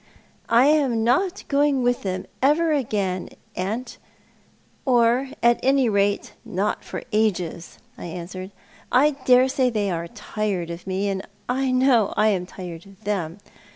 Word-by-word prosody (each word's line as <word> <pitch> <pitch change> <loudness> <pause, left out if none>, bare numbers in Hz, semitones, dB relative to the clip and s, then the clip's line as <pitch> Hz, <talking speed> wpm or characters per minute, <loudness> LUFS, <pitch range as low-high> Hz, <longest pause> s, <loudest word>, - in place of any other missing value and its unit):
" - - -36
I 235 +3 +5
am 275 -7 +3
not 345 - +1
going 280 -2 +2
with 245 0 +1
them 185 -1 -3 0.2
ever 310 +5 +3
again, 205 -10 -1 0.3
aunt, 215 +7 -4 0.8
or 245 +1 +3
at 235 0 +5
any 270 -2 +3
rate 200 -1 0
not 210 -2 -2
for - - -6
ages," 180 -6 -1 0.2
I - - -7
answered. 180 +2 -7 0.4
"I 285 +4 +5
dare 260 -2 +4
say 260 -1 +1
they 210 -4 -1
are 170 -1 -3
tired 190 -2 -3
of 170 +3 -8
me, 190 +2 -1
and 195 -1 -1 0.3
I 260 +2 0
know 255 -4 +3
I 215 +1 +4
am 180 -3 -1
tired 175 -1 -9
of 195 +2 -18
them. 190 -4 -2
220 Hz, 155 wpm, -23 LUFS, 190-260 Hz, 0.8 s, I